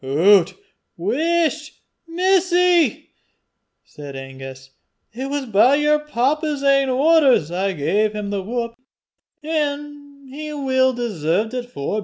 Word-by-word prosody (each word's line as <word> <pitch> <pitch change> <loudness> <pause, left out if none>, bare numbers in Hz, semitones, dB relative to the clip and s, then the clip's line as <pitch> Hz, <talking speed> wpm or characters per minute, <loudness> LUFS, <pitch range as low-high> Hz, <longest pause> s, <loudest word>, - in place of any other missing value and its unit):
"Hoots! 170 +7 +3 0.4
whisht, 310 - -1 0.3
missie!" 360 -1 +2 0.7
said 145 -2 -11
Angus. 135 0 -10 0.4
"It 260 +4 -5
was 285 -1 -3
by 230 +4 +4
yer 300 +1 +2
papa's 300 +1 -1
ain 275 -1 +3
orders 270 - +3
I 190 +2 -1
gae 185 +8 0
him 210 -1 -5
the 200 -1 -2
whup, 235 +3 -4 0.7
an' 290 -2 -4
he 300 +3 -7
weel 260 -2 +1
deserved 215 -2 -2
it 245 -1 -5
forby. 200 - -3
260 Hz, 115 wpm, -20 LUFS, 200-300 Hz, 0.7 s, by